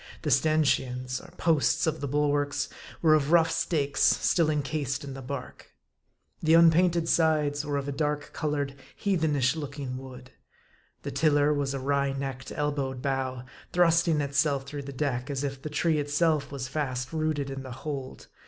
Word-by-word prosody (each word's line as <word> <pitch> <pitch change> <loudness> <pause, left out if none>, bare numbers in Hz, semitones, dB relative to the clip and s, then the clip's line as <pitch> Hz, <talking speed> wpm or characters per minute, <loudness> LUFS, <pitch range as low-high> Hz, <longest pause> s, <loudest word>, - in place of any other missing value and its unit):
The - - 0
stanchions, 130 -4 +1
or - - -14
posts 160 0 +2
of 160 -2 -1
the 140 - -2
bulwarks, 145 0 0 0.3
were 155 -2 +6
of 150 -1 +2
rough 165 -1 +5
stakes, 145 -5 -1
still 165 -3 +3
incased 145 -2 -1
in 140 -1 -6
the 135 - -8
bark. 135 +1 -8 0.7
The 160 0 +4
unpainted 170 0 +5
sides 150 -3 +2
were 145 -1 -2
of 140 0 -3
a - - -2
dark 150 +1 -2
colored, 145 -3 -2 0.2
heathen 160 -7 0
ish 135 +2 +2
looking 145 -4 -5
wood. 130 -1 -11 0.7
The - - -4
tiller 150 -1 +3
was 140 -1 -1
a - - -3
wry 140 +1 0
necked, 135 -1 -5
elbowed 140 -3 -2
bough, 130 -2 -2 0.3
thrusting 170 -2 +3
itself 140 -1 +1
through 145 +1 -6
the - - -4
deck, 130 -2 -2
as 140 -1 -2
if 135 -1 -4
the 155 - -5
tree 155 +1 +1
itself 145 0 +1
was 135 -2 -4
fast 130 -2 -3
rooted 155 -3 -1
in 135 0 -5
the 130 -1 -8
hold. 135 +1 -6
145 Hz, 170 wpm, -28 LUFS, 135-155 Hz, 0.7 s, were